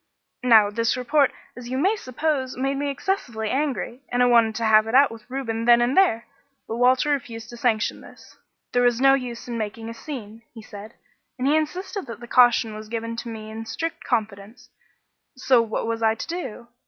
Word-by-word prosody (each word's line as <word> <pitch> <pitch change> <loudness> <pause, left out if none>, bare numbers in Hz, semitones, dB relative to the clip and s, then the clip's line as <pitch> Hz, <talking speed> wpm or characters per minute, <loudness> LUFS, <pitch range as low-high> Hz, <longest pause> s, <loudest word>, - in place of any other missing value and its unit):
"Now 220 -5 +5
this 230 +3 0
report, 275 +3 +2 0.2
as 245 -1 -9
you 260 - -2
may 380 +10 +2
suppose, 265 - -2
made 270 +1 -1
me 285 +1 -2
excessively 260 - -3
angry, 270 -3 -2
and 245 0 +2
I - - +5
wanted 230 -2 +4
to 230 - -2
have 215 0 +5
it 225 - -1
out 275 +1 +6
with 225 +1 -12
Reuben 230 -4 -3
then 240 0 +6
and 240 +2 +1
there. 355 -13 +3 0.4
But 225 - -4
Walter 255 +4 +3
refused 230 -5 -4
to 240 - -9
sanction 230 -3 0
this - - -16 0.4
'there 245 - +3
was 245 -1 +2
no 270 +1 +6
use 250 -3 -3
in 235 -1 -4
making 225 +1 -5
a - - -6
scene' 230 -4 -8
he 225 - -9
said 210 +1 -11 0.4
and 255 +1 -1
he 295 - +4
insisted 365 +6 -3
that 230 -2 -8
the 240 - -10
caution 240 -3 +4
was 215 0 -9
given 230 0 -4
to 235 - -5
me 220 -1 -8
in 225 +1 -7
strict 325 +9 -4
confidence; 215 -2 -4 0.7
so 255 -2 +4
what 225 -1 -3
was 230 0 -3
I 220 0 +3
to 225 - -7
do? 325 -9 -6
240 Hz, 205 wpm, -23 LUFS, 225-270 Hz, 0.7 s, out